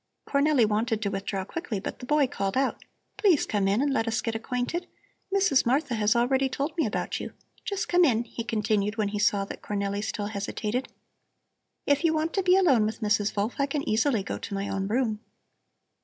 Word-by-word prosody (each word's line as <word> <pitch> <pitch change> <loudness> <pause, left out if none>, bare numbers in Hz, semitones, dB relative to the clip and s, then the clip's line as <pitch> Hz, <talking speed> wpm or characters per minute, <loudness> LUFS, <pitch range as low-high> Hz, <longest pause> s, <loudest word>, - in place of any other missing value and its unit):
Cornelli 280 -3 +3
wanted 220 +1 0
to 200 - -1
withdraw 195 -1 -3
quickly, 240 - -4
but - - -6
the 250 - -9
boy 295 0 +4
called 200 -6 -2
out: 270 0 0 0.3
"Please 395 -8 +4
come 200 -2 0
in 205 +7 +2
and 285 -1 +1
let 225 -3 0
us 225 0 0
get 230 - -2
acquainted. 250 +9 -3 0.4
Mrs. 385 -9 +3
Martha 265 +2 +1
has 215 -1 +2
already 265 +3 +2
told 280 +4 -3
me 330 - +1
about - - -2
you. - - -6 0.3
Just 400 -1 -2
come 355 0 +4
in," 240 -7 +3
he 235 0 -6
continued, 215 -2 0
when 210 -2 +1
he 205 0 -3
saw 205 -1 +2
that - - -8
Cornelli 200 0 -2
still 210 -1 -3
hesitated. 210 +4 -3 1.0
"If 285 +2 +2
you 320 -1 +3
want 315 +1 -1
to 390 - +1
be 365 0 +4
alone 275 - +4
with 220 +2 -5
Mrs. 210 -1 +1
Wolf 210 +4 0
I 280 - +2
can 280 0 -3
easily 220 0 +2
go - - -4
to 205 - -7
my 195 +1 -2
own 195 0 -2
room." 220 -1 0
230 Hz, 205 wpm, -27 LUFS, 210-285 Hz, 1.0 s, boy